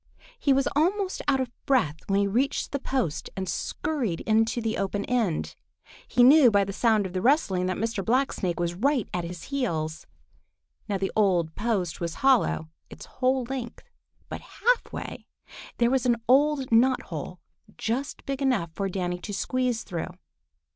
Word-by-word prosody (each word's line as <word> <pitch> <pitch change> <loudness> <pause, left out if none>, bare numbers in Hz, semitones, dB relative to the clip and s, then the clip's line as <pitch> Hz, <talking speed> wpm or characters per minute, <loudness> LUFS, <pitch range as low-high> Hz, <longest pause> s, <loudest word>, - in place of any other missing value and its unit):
He 280 - +2
was 270 0 +3
almost 375 +5 +1
out 275 -2 +3
of 255 -2 -2 0.2
breath 230 - +2
when 195 0 +2
he - - +2
reached 240 +8 0
the 280 - -2
post 260 - -2
and 190 -1 -3
scurried 230 - -2
into 225 +2 +2
the 225 -1 -1
open 200 +1 -2
end. 225 -10 0 0.5
He 245 - +3
knew 270 0 +8
by 200 -2 +3
the 195 0 -5
sound 215 -1 +2
of 185 - -6
the 185 - -1
rustling 200 - +2
that 185 - -1
Mr. 225 -2 -2
Blacksnake 230 -8 0
was 170 0 -1
right 255 +5 +1
at 175 -1 -2
his 175 0 -7
heels. 160 - -2 0.8
Now 200 - 0
the 195 0 -2
old 180 -6 +2
post 200 -7 -2
was 170 -1 -3
hollow 245 -11 +3 0.2
its - - -11
whole 255 0 0
length, 245 -1 -7 0.4
but - - -6
half - - 0
way - - -7 0.5
there 235 0 +3
was 260 -2 +1
an 240 - +4
old 275 0 +3
knot 250 +3 +4
hole - - -7 0.4
just 250 +5 -3
big 275 0 -3
enough 245 -12 +1
for 195 +2 -2
Danny 180 -1 -2
to 205 +4 -7
squeeze 250 -1 -1
through. 175 -2 -4
225 Hz, 170 wpm, -26 LUFS, 185-265 Hz, 0.8 s, knew